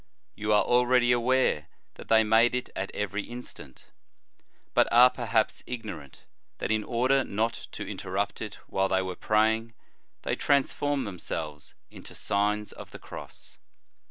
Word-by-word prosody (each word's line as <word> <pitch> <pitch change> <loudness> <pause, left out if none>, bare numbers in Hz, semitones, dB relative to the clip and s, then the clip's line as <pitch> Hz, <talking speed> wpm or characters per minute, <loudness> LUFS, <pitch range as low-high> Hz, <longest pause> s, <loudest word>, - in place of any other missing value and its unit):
You 105 +1 -2
are 105 - +5
already 125 0 +3
aware 120 -10 +2 0.3
that - - -12
they 110 0 +5
made 115 +3 +4
it 125 - -3
at 95 - -3
every 105 0 -2
instant, 120 - -10 0.9
but - - +4
are, 125 +2 +8
perhaps, 115 -3 0
ignorant, 110 - -7 0.3
that - - -2
in 110 -1 +1
order 130 +4 +2
not 110 +1 -2
to - - -5
inter 95 - -7
rupt 100 +2 -2
it 105 -2 -5
while 95 0 0
they 95 0 +2
were 95 -1 -4
praying, 110 +3 +1 0.5
they - - -1
trans 140 -1 +2
formed 145 -2 -1
themselves 80 -6 -5 0.2
into - - -11
Signs 105 +1 0
of - - -11
the - - -10
Cross. - - -11
110 Hz, 155 wpm, -28 LUFS, 100-125 Hz, 0.9 s, are